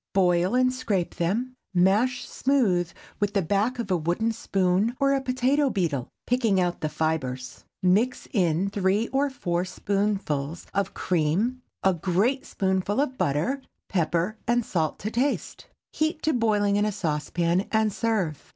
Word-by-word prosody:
Boil 180 +2 +3
and 255 0 +3
scrape 200 -8 -1
them, 230 +10 -1 0.2
mash 210 +8 +2
smooth 200 -11 +1 0.3
with 205 0 0
the 200 - +4
back 205 +8 +1
of 230 -5 -4
a - - +4
wooden 175 +8 0
spoon, 195 +1 +1
or 275 0 +3
a 275 - +1
potato 265 +2 +2
beetle, 165 - -1 0.2
picking 230 -6 +2
out 175 -1 0
the 155 - -1
fibres; 135 -5 -3 0.2
mix 210 +8 +2
in 185 -2 +1
three 200 +3 +1
or 275 +2 +1
four 175 -9 -1
spoonfuls 185 -5 -2
of 200 -1 -1
cream, 185 +10 0 0.2
a 190 - +4
great 195 - 0
spoonful 190 +3 0
of 275 -2 0
butter, 200 - 0 0.3
pepper 175 +4 0
and 240 -1 +2
salt 165 -9 -1
to 215 - -4
taste. 265 +5 -1 0.3
Heat 310 0 -1
to 315 - +2
boiling 210 -4 +2
in 205 - +2
a 215 - 0
saucepan, 170 0 -1
and 220 -2 +2
serve. 200 - -1
200 Hz, 150 wpm, -26 LUFS, 175-240 Hz, 0.3 s, the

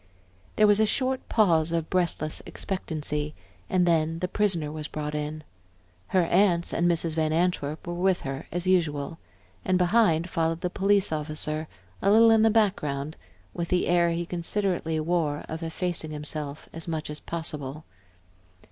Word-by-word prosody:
There 215 - +5
was 205 0 +5
a 220 - +4
short 260 +3 0
pause 165 -7 +3
of 165 -1 -2
breathless 170 -4 0
expectancy, 150 -5 -3 0.3
and 185 -1 +3
then 165 -1 +2
the 180 - -2
prisoner 180 -7 0
was 155 -1 -5
brought 150 -1 -4
in. 150 +1 -4 0.6
Her 185 -2 +3
aunts 175 0 +2
and 175 +1 +2
Mrs. 165 -1 +1
Van 155 -1 0
Antwerp 160 -3 0
were 175 - -4
with 180 +1 +1
her 135 +2 -5
as 175 +1 -2
usual, 165 -4 +1 0.4
and 185 -1 +2
behind 180 -3 +3
followed 165 -1 -1
the 180 - -2
police 200 -1 +2
officer 155 0 -2 0.3
a 195 - +2
little 225 +2 +7
in 225 -1 +5
the 225 - +5
background, 155 -10 0
and 95 0 -30
with 170 - -3
the 180 +1 +1
air 175 -1 +3
he 170 +1 -1
considerately 175 -2 -1
wore 155 -2 0
of 160 +1 -5
effacing 165 0 -3
himself 150 -1 -5
as 165 +1 -6
much 160 -2 -3
as 150 - -7
possible. 155 -3 -4
165 Hz, 165 wpm, -27 LUFS, 155-185 Hz, 0.6 s, little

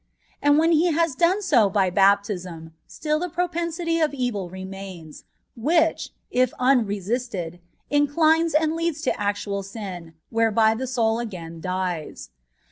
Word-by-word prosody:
And 290 0 +4
when 325 +2 +3
He 335 +2 +3
has 330 -1 +1
done 350 +9 +2
so 245 - +4
by 190 -2 +1
baptism, 185 -4 +1 0.2
stili 305 0 -1
the 360 +2 -3
propensity 335 0 -1
to 310 -2 +3
evil 215 -8 -2
remains, 190 -4 -9 0.3
which^ 320 +7 +1 0.2
if 255 0 +2
unresisted, 210 -7 0 0.3
incHnes 310 +3 +3
and 315 0 0
leads 330 -2 -2
to - - +1
actual 200 -1 -2
sin, 190 -5 -8 0.2
whereby 225 -1 +3
the 260 +4 -4
soul 230 -2 +1
again 170 -8 -7
dies. 180 - -4
230 Hz, 130 wpm, -24 LUFS, 190-315 Hz, 0.3 s, And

